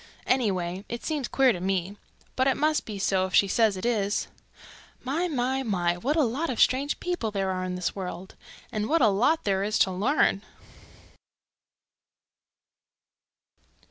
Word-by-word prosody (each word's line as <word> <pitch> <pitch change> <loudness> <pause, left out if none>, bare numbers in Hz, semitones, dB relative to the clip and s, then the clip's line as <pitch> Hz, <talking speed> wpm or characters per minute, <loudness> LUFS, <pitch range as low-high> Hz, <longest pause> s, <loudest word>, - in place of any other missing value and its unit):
Anyway, 190 -7 0
it 235 - -5
seems 295 -6 -2
queer 265 -2 +3
to 180 - -5
me. 190 +1 -1 0.4
But 260 +1 +2
it 270 - +2
must 305 +1 +1
be 210 -2 -5
so 190 -1 +1
if 185 - -3
she 200 - +5
says 215 -1 +2
it 185 - -5
is. 210 -4 0 0.7
My, 310 +8 -1
my, 265 -3 -1
my, 180 -8 0
what 260 +12 -1
a 315 - +3
lot 275 +7 -1
of 245 - -3
strange 275 +3 +2
people 350 -11 -2
there 195 -2 -1
are 185 0 -3
in 180 0 -3
this 180 -1 -3
world! 185 -1 -6 0.4
And 215 +2 -2
what 325 -3 +3
a 220 - +6
lot 255 +12 +2
there 195 -1 0
is 210 +2 0
to 190 - +3
learn!" 200 +1 +1
215 Hz, 165 wpm, -26 LUFS, 190-265 Hz, 0.7 s, a